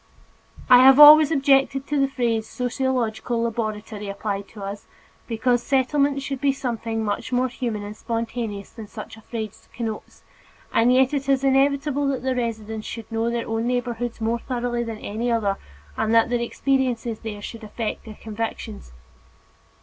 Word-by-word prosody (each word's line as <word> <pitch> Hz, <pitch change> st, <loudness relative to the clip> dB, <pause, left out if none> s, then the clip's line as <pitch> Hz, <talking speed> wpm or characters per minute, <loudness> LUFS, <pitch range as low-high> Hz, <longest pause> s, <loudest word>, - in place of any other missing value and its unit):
I 250 Hz, -2 st, +8 dB
have 265 Hz, +2 st, +8 dB
always 300 Hz, 0 st, +10 dB
objected 270 Hz, -2 st, +2 dB
to 295 Hz, 0 st, -1 dB
the 275 Hz, -, +3 dB
phrase 230 Hz, -4 st, -1 dB
"sociological 245 Hz, -2 st, -1 dB
laboratory" 215 Hz, -2 st, -3 dB
applied 200 Hz, 0 st, -4 dB
to 210 Hz, -3 st, -10 dB
us, 200 Hz, +1 st, -6 dB, 0.4 s
because 245 Hz, +1 st, +1 dB
Settlements 275 Hz, +1 st, +1 dB
should 275 Hz, -2 st, -4 dB
be 280 Hz, -1 st, +3 dB
something 230 Hz, -4 st, -3 dB
much 205 Hz, +4 st, -3 dB
more 250 Hz, +1 st, +2 dB
human 230 Hz, -4 st, -4 dB
and 205 Hz, +1 st, -7 dB
spontaneous 230 Hz, -3 st, -4 dB
than 220 Hz, -2 st, -9 dB
such 215 Hz, +1 st, -9 dB
a 220 Hz, -, -15 dB
phrase 220 Hz, -2 st, -7 dB
connotes, 225 Hz, -3 st, -6 dB, 0.5 s
and 235 Hz, +2 st, +4 dB
yet 260 Hz, +2 st, +4 dB
it 275 Hz, -1 st, -2 dB
is 270 Hz, -1 st, +2 dB
inevitable 280 Hz, +1 st, +2 dB
that 270 Hz, -2 st, -2 dB
the 260 Hz, 0 st, 0 dB
residents 220 Hz, -3 st, -3 dB
should 230 Hz, -2 st, -7 dB
know 225 Hz, +1 st, 0 dB
their 235 Hz, -1 st, -2 dB
own 225 Hz, +1 st, -1 dB
neighborhoods 245 Hz, -1 st, -2 dB
more 230 Hz, +1 st, 0 dB
thoroughly 240 Hz, -1 st, -2 dB
than 225 Hz, -2 st, -5 dB
any 220 Hz, +3 st, -3 dB
other, 205 Hz, -4 st, +1 dB, 0.4 s
and 220 Hz, -, +1 dB
that 230 Hz, +1 st, +4 dB
their 240 Hz, -1 st, +1 dB
experiences 245 Hz, -2 st, -1 dB
there 215 Hz, -2 st, -6 dB
should 225 Hz, +2 st, -8 dB
affect 215 Hz, +1 st, -4 dB
their 215 Hz, -1 st, -9 dB
convictions. 220 Hz, -, -6 dB
235 Hz, 165 wpm, -23 LUFS, 220-265 Hz, 0.5 s, always